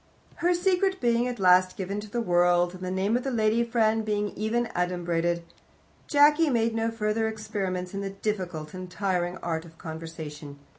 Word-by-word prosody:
Her 350 +1 +2
secret 380 +1 +1
being 240 0 +2
at 245 -3 -4
last 185 0 +4
given 195 +2 -3
to 210 0 -8
the 235 +3 -1
world, 175 -1 +3
and 185 - -10
the 185 - -2
name 190 +4 0
of 245 - +1
the 270 - -1
lady 225 -1 +2
friend 225 -2 +1
being 210 -1 -1
even 220 +5 -1
adumbrated, 175 -1 0 0.6
Jacky 295 +2 +5
made 230 -3 +1
no 225 0 0
further 220 0 0
experiments 200 -4 -3
in 195 - -3
the 195 - -3
difficult 185 -6 -4
and 185 0 -7
tiring 180 -2 -1
art 165 -1 -2
of 165 -1 -15
conversation. 160 -3 -8
200 Hz, 180 wpm, -27 LUFS, 175-225 Hz, 0.6 s, Jacky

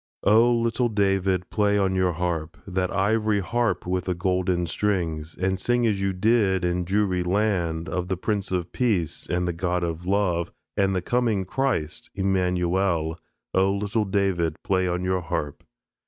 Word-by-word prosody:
O 115 +4 +5
Little 115 +1 +1
David, 95 -3 +1
play 105 -1 +2
on 95 -2 +2
your 95 -1 +1
harp, 85 0 -3
That 95 -1 -1
ivory 105 +1 +1
harp 115 -2 0
with 90 0 -1
the 90 - -1
golden 90 -1 0
strings; 85 -4 -2
And 95 +1 0
sing 120 +4 +1
as 105 -4 +1
you 100 0 +1
did 95 -1 +2
in 90 0 0
Jewry 95 -1 +1
land, 90 -4 0
Of 90 -1 -2
the 95 0 -1
Prince 100 +1 -2
of 90 -2 -2
Peace 105 - -1
and 90 +1 0
the 85 - -1
God 90 +1 -1
of 85 +1 -4
Love 95 -4 +1 0.2
And 95 -1 +2
the 90 - -1
Coming 115 -4 +1
Christ 110 - -2
Immanuel. 90 -3 0 0.3
O 95 +1 +3
Little 105 +2 -1
David, 95 -5 0
play 95 -1 +1
on 90 0 -1
your 95 0 0
harp. 80 -4 -4
95 Hz, 165 wpm, -25 LUFS, 90-100 Hz, 0.3 s, O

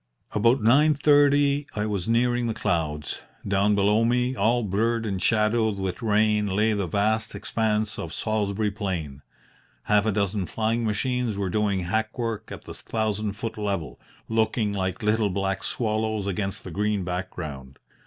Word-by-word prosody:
"About 115 +3 +3
nine 145 +7 +5
thirty 145 0 +4
I 105 0 -1
was 100 -1 -2
nearing 120 +1 +2
the 115 - -2
clouds. 75 -3 -2 0.3
Down 100 +1 +2
below 105 +3 +3
me, 125 +2 +1
all 115 +3 +2
blurred 115 +3 0
and 95 -3 -2
shadowed 110 0 +2
with 95 -2 -3
rain, 105 -1 +2
lay 105 +3 +2
the 100 -3 -1
vast 110 +5 0
expanse 110 -1 -1
of - - -5
Salisbury 105 -1 -1
Plain. 85 -9 -4 0.6
Half 105 0 +2
a - - +3
dozen 100 -2 -1
flying 115 +1 -1
machines 115 +1 -1
were 95 -2 -2
doing 100 -2 +1
hackwork 110 +4 -2
at - - -8
the - - -8
thousand 110 -2 -2
foot 110 +1 -5
level, 95 -12 -3 0.3
looking 110 -1 +1
like 95 +2 -2
little 105 0 +2
black 95 0 -2
swallows 110 -2 -1
against 100 0 -2
the 90 - -7
green 105 +1 0
background. 80 -7 -5
105 Hz, 155 wpm, -25 LUFS, 100-115 Hz, 0.6 s, nine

